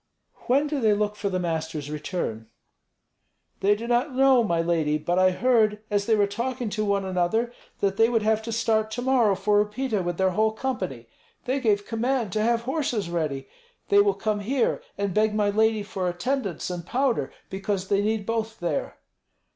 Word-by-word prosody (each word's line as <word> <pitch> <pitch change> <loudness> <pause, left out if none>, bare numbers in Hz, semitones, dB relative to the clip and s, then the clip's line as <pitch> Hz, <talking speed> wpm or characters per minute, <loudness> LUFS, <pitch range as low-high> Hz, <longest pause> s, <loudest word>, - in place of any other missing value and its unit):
"When 275 +4 +3
do 295 -1 -2
they 215 -2 +4
look 210 0 -1
for 205 -1 -2
the 185 - -1
master's 160 -4 -3
return?" 150 - -4 1.1
"They 205 +2 +3
do 225 +3 -6
not 245 +3 0
know, 265 -2 +5
my 170 -6 0
lady. 165 -3 +1
But 175 +4 0
I 185 0 +5
heard, 215 +1 +2
as 205 -1 0
they 225 - +4
were 205 -1 +3
talking 235 +3 -3
to 215 - -1
one 200 -1 0
another, 190 +6 0 0.3
that 195 -1 +1
they 225 +1 +5
would 225 -3 +1
have 220 0 +2
to 230 +1 -6
start 220 -1 +1
to 245 +3 -4
morrow 245 -6 +3
for 210 +1 +3
Upita 210 -1 -2
with 175 -1 -3
their 190 0 +2
whole 215 +3 +1
company. 185 - -4 0.4
They 260 +2 0
gave 205 -5 +1
command 235 -1 -1
to 215 - 0
have 230 +1 +2
horses 245 - -2
ready. 150 -6 -2 0.4
They 405 - +6
will 405 0 +4
come 215 -1 -1
here 245 +5 0 0.2
and 200 -2 -1
beg 215 +1 +2
my 205 -1 +2
lady 220 0 +2
for 190 -3 -2
attendants 190 - -2
and 175 -1 -5
powder, 255 +6 0 0.2
because 195 0 -2
they 200 0 +3
need 215 0 -1
both 225 0 -2
there." 170 -4 -2
210 Hz, 190 wpm, -25 LUFS, 185-235 Hz, 1.1 s, They